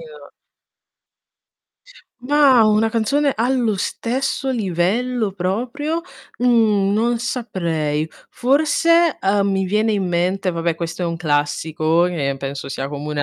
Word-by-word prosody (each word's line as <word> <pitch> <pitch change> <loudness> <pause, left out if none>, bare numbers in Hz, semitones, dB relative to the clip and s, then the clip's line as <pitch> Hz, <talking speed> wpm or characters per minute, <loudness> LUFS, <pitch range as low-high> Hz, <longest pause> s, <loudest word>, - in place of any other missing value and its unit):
no 475 -1 -13 1.9
Na, 265 -2 +4
una 215 +1 +3
canzone 275 +6 +1
allo 235 -2 +1
stesso 265 +7 -2
livello 215 +2 -1
proprio, 245 - -2 0.4
mhmm, 220 -5 +3
non 230 +2 +1
saprei. 170 - -2 0.2
Forse, 310 +5 +2
ehm, 200 +1 +1
mi 190 0 0
viene 210 +4 +1
in 195 -2 -1
mente 180 +2 0
vabbè 165 -1 -1
questo 170 +1 -5
è - - 0
un 170 -1 -2
classico, 155 +1 0
che 145 -6 -1
penso 140 +1 -5
sia 135 0 -4
comune 145 +1 -3
205 Hz, 120 wpm, -20 LUFS, 170-250 Hz, 1.9 s, Na